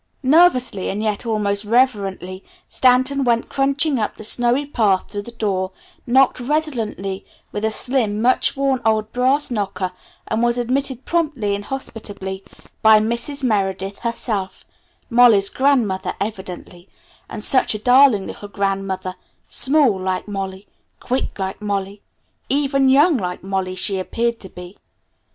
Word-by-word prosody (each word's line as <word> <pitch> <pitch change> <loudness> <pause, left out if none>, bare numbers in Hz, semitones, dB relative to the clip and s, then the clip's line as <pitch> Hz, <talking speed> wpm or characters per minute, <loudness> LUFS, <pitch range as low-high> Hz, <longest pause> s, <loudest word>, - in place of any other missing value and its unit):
Nervously, 260 - +3
and 205 +2 -3
yet 215 +2 -2
almost 205 -2 -1
reverently, 200 -5 0 0.2
Stanton 260 +2 +2
went 235 -2 +1
crunching 275 0 +1
up 215 - -2
the - - -10
snowy 245 +5 +2
path 215 -9 +1
to 205 - -4
the 205 - -10
door, 195 -5 -2 0.3
knocked 260 +2 +3
resonantly 240 -9 -2 0.3
with 205 - -5
a 220 - +2
slim, 220 -2 +1
much 255 +4 +1
worn 270 -2 0
old 220 -1 +1
brass 260 +3 +1
knocker, 195 -4 -2 0.4
and 220 - -1
was 240 0 +2
admitted 260 +1 -2
promptly 295 -12 -1
and 200 0 -4
hospitably 205 -7 -6 0.4
by 220 -1 +7
"Mrs. 235 +6 -2
Meredith" 195 -4 -1
herself 220 -4 -4 0.4
Molly's 230 -5 +5
grandmother 220 -9 +1
evidently, 190 -3 -6 0.4
and 210 - -6
such 260 -3 +3
a - - -1
darling 245 -2 +4
little 205 - -8
grandmother, 195 -2 -2 0.3
small, 265 -7 +3
like 185 +1 -3
Molly; 195 -1 -5 0.3
quick, 260 +1 -3
like 190 +1 -4
Molly; 200 -1 -3 0.5
even 275 -1 +2
young, 290 +4 +5
like 180 -4 -4
Molly, 190 -1 -3
she 190 +1 -1
appeared 235 +4 -2
to 190 - -10
be. 180 +2 -12
220 Hz, 135 wpm, -20 LUFS, 195-260 Hz, 0.5 s, by